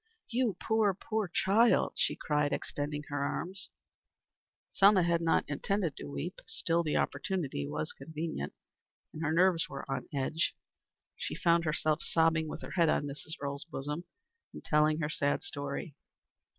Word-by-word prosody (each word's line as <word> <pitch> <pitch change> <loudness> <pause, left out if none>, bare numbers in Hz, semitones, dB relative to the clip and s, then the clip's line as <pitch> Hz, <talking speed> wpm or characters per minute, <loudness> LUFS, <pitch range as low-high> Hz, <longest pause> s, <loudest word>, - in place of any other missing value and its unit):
"You, 235 -6 +1
poor, 220 -3 +2
poor 215 +1 -2
child," 215 +7 +4
she - - +1
cried 150 -1 0
extending 145 0 -3
her 145 -1 -1
arms. 180 +6 -3 1.0
Selma 195 -2 +6
had 170 0 +2
not 165 -1 +2
intended 165 +2 -1
to 75 - -7
weep. 70 0 -4
Still 170 +1 +1
the 155 -3 0
opportunity 150 - -1
was 75 +2 -3
convenient, 155 - -5 0.6
and 155 - -6
her 155 -1 +1
nerves 175 0 +3
were 140 0 -6
on 135 -2 -3
edge. 145 +4 0 0.6
She - - -3
found 170 -1 +3
herself 155 0 +1
sobbing 160 -1 +2
with - - -6
her - - -7
head 170 -3 +3
on 145 - +2
Mrs. 145 +2 -6
Earle's, 140 0 -3
bosom, 150 +5 -4 0.5
and - - -10
telling 155 +1 +3
her 150 - 0
sad 140 -2 0
story. 140 +1 -3
155 Hz, 150 wpm, -32 LUFS, 145-175 Hz, 1.0 s, Selma